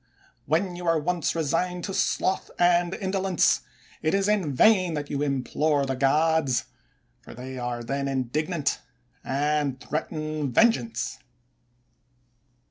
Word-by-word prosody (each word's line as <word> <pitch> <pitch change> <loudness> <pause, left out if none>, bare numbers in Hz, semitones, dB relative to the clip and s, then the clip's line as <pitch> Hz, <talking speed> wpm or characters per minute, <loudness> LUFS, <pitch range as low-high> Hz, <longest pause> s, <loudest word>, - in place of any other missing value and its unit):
When 175 +4 +1
you 175 0 -6
are 165 -1 +4
once 170 +2 -1
resigned 170 +3 -1
to 195 - -4
sloth 190 0 0
and 175 0 +3
indolence, 190 -3 +1 0.4
it 155 +4 +1
is 195 0 +1
in 200 -8 +1
vain 185 - +4
that 145 -1 -4
you 140 -1 -1
implore 145 +1 0
the 135 0 -2
gods; 140 -1 +2 0.6
for - - -12
they 130 +1 -7
are 120 -1 -3
then 140 +3 -2
indignant 145 +4 -1 0.4
and 145 -1 0
threaten 155 -1 -3
vengeance. 125 - +2
155 Hz, 125 wpm, -26 LUFS, 135-175 Hz, 0.6 s, are